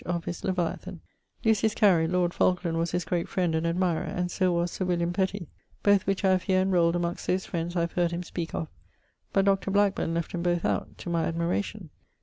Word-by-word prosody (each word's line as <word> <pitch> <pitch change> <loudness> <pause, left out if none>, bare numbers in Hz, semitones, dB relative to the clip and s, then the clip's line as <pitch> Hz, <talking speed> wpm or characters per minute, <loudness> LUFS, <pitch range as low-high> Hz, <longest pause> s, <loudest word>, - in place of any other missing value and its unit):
of 170 -1 -3
his 170 - -5
Leviathan. 180 0 -2 0.5
Lucius 220 -1 +3
Carey, 180 -7 +4
lord 175 0 +1
Falkland 180 -2 +1
was 165 +1 0
his 180 -2 -2
great 170 0 -1
friend 180 -3 0
and 160 +1 0
admirer, 170 -1 +1
and 180 0 -3
so 185 0 +1
was 170 0 0
Sir - - -3
William 175 -1 0
Petty; 190 -1 -1 0.4
both 200 -2 +4
which 195 0 0
I 190 - +5
have 185 -1 +3
here 185 0 +2
enrolled 175 -3 +3
amongst 175 0 -2
those 185 +1 0
friends 170 0 -3
I 170 - +2
have 170 0 -1
heard 175 -1 +1
him 170 +1 -4
speake 170 -1 -5
of, 160 - -2 0.6
but 195 0 +2
Dr. 195 0 +2
Blackburne 200 -4 +1
left 170 -1 -3
'em 175 - -2
both 175 -1 0
out - - -1
(to - - -7
my 165 -1 +1
admiration). 170 +2 -2
175 Hz, 215 wpm, -27 LUFS, 170-190 Hz, 0.6 s, I